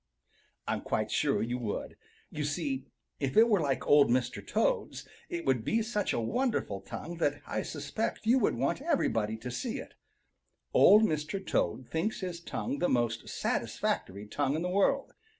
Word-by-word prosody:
I'm - - -1
quite - - -1
sure - - +2
you 120 +2 -2
would. 110 -4 -4 0.4
You 150 - -3
see, 145 -3 -2 0.3
if 135 -2 -1
it 225 +1 +8
were 210 -4 +3
like 140 -4 -1
Old 145 -2 +6
Mr. 120 -4 0
Toad's, - - -1 0.2
it 170 -1 -4
would 130 -5 +2
be 225 - +1
such 210 -2 -1
a - - 0
wonderful 115 - -1
tongue 170 - -7
that 145 -3 0
I - - -2
suspect 155 +11 -3
you 245 +4 +5
would 205 - +2
want 135 - 0
everybody 110 - 0
to 125 +3 -6
see 250 - -3
it. - - -8 0.8
Old 215 +2 +7
Mr. 155 0 0
Toad 120 +8 0
thinks 175 +8 -2
his 180 -2 -4
tongue 250 +10 -4
the 180 - +2
most 115 -2 0
satisfactory 100 +2 -2
tongue 140 +6 -1
in 160 - -1
the 180 - -1
world. 200 +8 +2
150 Hz, 170 wpm, -30 LUFS, -, 0.8 s, it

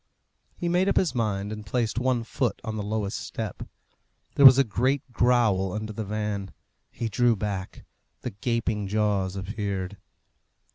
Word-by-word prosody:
He 175 - -2
made 180 +3 +2
up - - +1
his 180 - +2
mind, 105 -4 -1
and 105 0 -6
placed 115 +2 -1
one 125 -2 +1
foot 120 +1 -1
on 110 - -4
the 105 - -3
lowest 105 0 -2
step. 110 -4 -5 0.7
There 140 - +10
was 130 0 +8
a 140 - +6
great 130 +5 0
growl 115 -7 +2
under 110 0 -4
the 110 - -4
van. 105 -1 -3 0.4
He 115 - -4
drew 120 +2 +3
back. 95 -2 -5 0.4
The 125 - -4
gaping 105 0 -1
jaws 100 -2 0
appeared. 100 -1 -4
110 Hz, 155 wpm, -26 LUFS, 100-120 Hz, 0.7 s, There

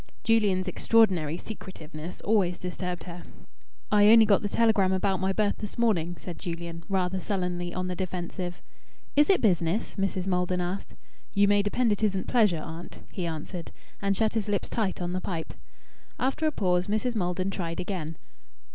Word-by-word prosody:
Julian's 205 -5 +3
extraordinary 185 -9 +3
secretiveness 170 -6 -8
always 195 -5 +2
disturbed 180 -1 -4
her. 175 0 -8 0.7
"I 205 0 +6
only 225 -1 +8
got 205 -2 +4
the 205 - -2
telegram 220 -4 +3
about 190 0 +1
my 190 +1 +1
berth 205 +1 +1
this 210 - -5
morning," 175 -8 +1
said 175 -3 -8
Julian, 170 -1 -5
rather 190 -1 0
sullenly 180 -3 -2
on 185 +1 -2
the 180 0 -3
defensive. 180 0 -4 0.5
"Is 295 +4 +5
it 390 - +5
business?" 180 0 +1
Mrs. 195 -2 -1
Maldon 180 -1 0
asked. 180 +2 -4 0.4
"You 200 0 +5
may 205 0 +4
depend 220 +3 +1
it 205 - 0
isn't 195 -3 +1
pleasure, 210 -10 +3
aunt," 165 +1 -8
he 180 -3 -3
answered, 165 +2 -5 0.3
and 200 -1 +1
shut 220 -1 +2
his 215 -2 -1
lips 200 -2 0
tight 195 -5 -1
on 175 0 -2
the 185 - -1
pipe. 165 -4 -4 0.6
After 270 +5 0
a - - +2
pause 180 -7 +1
Mrs. 220 +4 0
Maldon 185 -1 0
tried 170 -4 -3
again. 170 -4 -4
185 Hz, 170 wpm, -28 LUFS, 175-210 Hz, 0.7 s, only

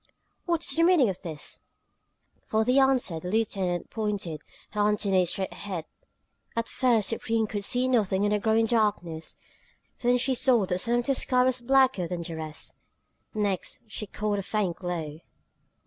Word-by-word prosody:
"What 335 -1 +1
is - - +1
the 330 - +2
meaning 335 - +5
of 185 - -5
this?" 160 -5 -7 0.9
For 220 +1 +1
answer 255 -9 +3
the 180 - -6
lieutenant 190 -5 -1
pointed 205 -8 -3 0.3
her 210 - -1
antennae 195 -3 +2
straight 190 +2 -2
ahead. 185 -6 -5 0.7
At 230 0 -1
first 235 -6 +2
Supreme 225 0 0
could 205 -1 -4
see 250 +5 +1
nothing 205 -6 +2
in 205 - +2
the 210 - +2
growing 220 +2 +3
darkness; 205 -8 0 0.6
then 245 0 +3
she 260 +2 +1
saw 245 -4 +3
that 180 0 -1
some 235 +5 +1
of 240 0 0
the 275 - +2
sky 250 -1 +2
was 255 -1 +1
blacker 260 -7 +3
than 175 0 -4
the 165 0 -5
rest. 155 -1 -5 0.6
Next 200 -3 -1
she 215 0 -6
caught 210 +1 -2
a - - -1
faint 195 -3 -1
glow. 165 -5 -4
210 Hz, 165 wpm, -27 LUFS, 185-240 Hz, 0.9 s, meaning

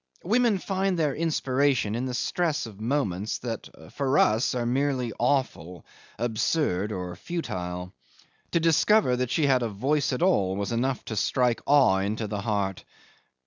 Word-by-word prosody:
Women 230 +2 +2
find 190 0 -1
their 150 -4 +1
inspiration 140 -7 +1
in 120 +3 -2
the 125 - -3
stress 170 +2 -1
of 105 -2 -11
moments 110 -6 -1
that 115 -2 -6 0.2
for 140 -1 0
us 110 +4 +3
are 120 -1 -1
merely 130 -2 0
awful, 120 - -1 0.3
absurd, 110 - 0
or 90 -3 -5
futile. 90 - -5 0.6
To 170 - +4
discover 165 -1 +3
that 125 -1 -1
she 155 +3 +1
had 130 -2 +3
a 115 - -1
voice 135 +10 0
at 130 +6 -1
all 100 - +2
was 100 +3 -3
enough 125 +2 -1
to 110 - -5
strike 125 +2 +1
awe 135 -10 +5
into 105 +3 -2
the 105 -1 -4
heart. 100 -3 -2
125 Hz, 155 wpm, -26 LUFS, 105-145 Hz, 0.6 s, awe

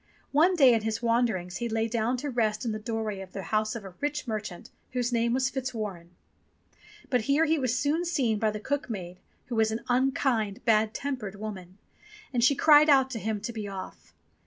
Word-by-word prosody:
One 335 +6 +4
day 270 -7 +6
in 225 - +2
his 220 +1 -3
wanderings 230 -7 0
he 235 -1 -3
lay 225 0 0
down 230 +2 0
to 285 +3 -4
rest 220 -2 0
in 230 - 0
the 215 - -4
doorway 220 -2 -3
of 190 -1 -11
the 195 - -5
house 215 +1 0
of 230 - -6
a 190 - -9
rich 295 -1 -2
merchant 215 -5 -5 0.2
whose 250 -1 0
name 235 0 +2
was 260 +1 +1
Fitzwarren. 215 -10 -4 1.0
But 245 -4 +1
here 300 +4 +4
he 320 0 +2
was 255 -2 0
soon 295 +6 +1
seen 255 -11 0
by 220 - +2
the 210 0 -4
cook 285 +4 -2
maid 185 -4 -6 0.3
who 245 -2 -5
was 220 -1 +3
an 220 +1 -3
unkind, 250 -4 +1
bad 220 -1 +3
tempered 250 -8 -4
woman, 195 -3 -8 0.6
and 240 -2 +1
she 275 +3 +5
cried 300 +1 +6
out 265 -2 +5
to 230 - -3
him 215 0 -2
to 235 +3 -5
be 215 -2 -5
off. 195 -1 -9
230 Hz, 205 wpm, -28 LUFS, 215-260 Hz, 1.0 s, day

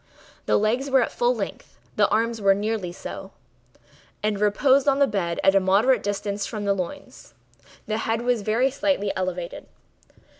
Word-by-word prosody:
The - - +3
legs 240 +6 0
were 265 -1 +4
at - - -4
full - - +1
length; - - -7 0.2
the - - +3
arms 230 +1 0
were 195 -1 +4
nearly 205 -3 -2
so, 190 +2 -8 0.9
and 210 -1 0
reposed 260 +7 +3
on 275 -1 +4
the 280 - +5
bed 190 -8 -2
at 195 - +5
a 195 - +5
moderate 200 +6 +3
distance 205 0 -3
from 210 -3 -5
the 200 - +2
loin. 190 +9 -5 0.7
The 215 0 -2
head 225 +1 -1
was 245 -2 +1
very 230 +6 +1
slightly 275 -7 0
elevated. 180 -2 -4
215 Hz, 165 wpm, -24 LUFS, 195-250 Hz, 0.9 s, the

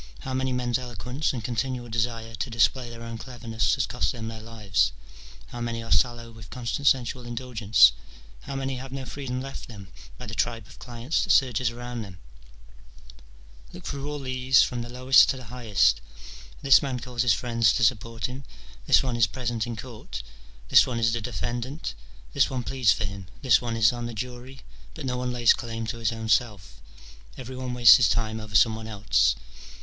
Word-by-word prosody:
how 130 - -5
many 130 0 0
men's 125 0 0
eloquence 125 +4 -3
and 120 -4 -5
continual 125 0 -2
desire 115 0 -2
to 125 - -4
display 120 +2 +1
their 115 0 -9
own 115 -1 -7
cleverness 115 -2 -1
has - - 0
cost - - -1
them 110 -2 -6
their 110 -1 -8
lives? 100 - 0 0.5
^ - - -21
how 120 - -6
many 115 -1 -3
are 115 - -9
sallow 120 -2 +1
with 110 -2 -13
constant 125 +3 -3
sensual 125 -1 +2
indulgence? 120 -3 +4 0.6
how 140 - -4
many 135 -1 -3
have 130 +1 -8
no 135 -1 -5
freedom 130 -2 -5
left 135 +1 -7
them 100 -5 -11 0.3
by - - -8
the - - -7
tribe 115 -3 -1
of - - -16
clients 120 +4 -2
that - - -6
surges 125 - +3
around 120 0 -6
them? 95 -4 -9 1.6
Look - - -10
through 140 +1 -4
all 150 - -4
these, 130 -1 +3
from 120 -1 -3
the 120 - -7
lowest 130 +2 +5
to 135 - 0
the 125 -2 -11
highest: 100 - +2 0.3
— - - -16
this 135 -1 +7
man 135 -4 -3
calls 120 -1 -3
his 120 -4 +4
friends 115 0 +2
to 120 - 0
support 115 0 0
him, 130 +2 -5 0.4
this - - +5
one 125 -3 -2
is 115 -2 +4
present 120 -1 -3
in 120 - -4
court, 110 - -8 0.5
this - - +7
one 120 - -3
is 115 0 +2
the 120 - -2
defendant, 120 - -4 0.4
this - - +3
one 130 -2 -3
pleads 130 -4 +2
for - - 0
him, 95 0 -6 0.2
this 125 -4 +5
one 115 -2 -3
is 110 +1 +4
on 120 -1 -4
the 120 - -7
jury: 125 +3 -7 0.3
but 155 - -7
no 125 -1 -1
one 125 0 -2
lays 120 -1 +5
claim 115 -1 -5
to 115 +2 -5
his 115 -1 0
own 110 -1 -5
self, 95 - 0 0.6
every 130 0 -8
one 130 -1 -4
wastes 120 -4 +9
his 115 -5 +3
time 110 -1 -1
over 110 -1 -8
some 110 +1 +5
one 110 0 -7
else. 95 - +2
120 Hz, 205 wpm, -26 LUFS, 115-125 Hz, 1.6 s, wastes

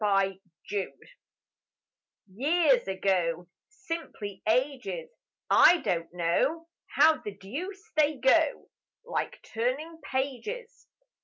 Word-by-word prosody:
Friends 195 -2 +2 1.9
Years 285 - +3
ago, 180 -3 0 0.2
Simply 305 - -6
ages; 275 - -1 0.4
I 355 - +7
don't 170 -2 -1
know 180 - 0 0.3
How 315 0 +5
the 205 -1 -7
deuce 370 - -7
they 305 0 +3
go: 285 +4 +2 0.3
Like - - -3
turning 275 +8 -2
pages! 270 - -4
265 Hz, 85 wpm, -28 LUFS, 195-325 Hz, 1.9 s, I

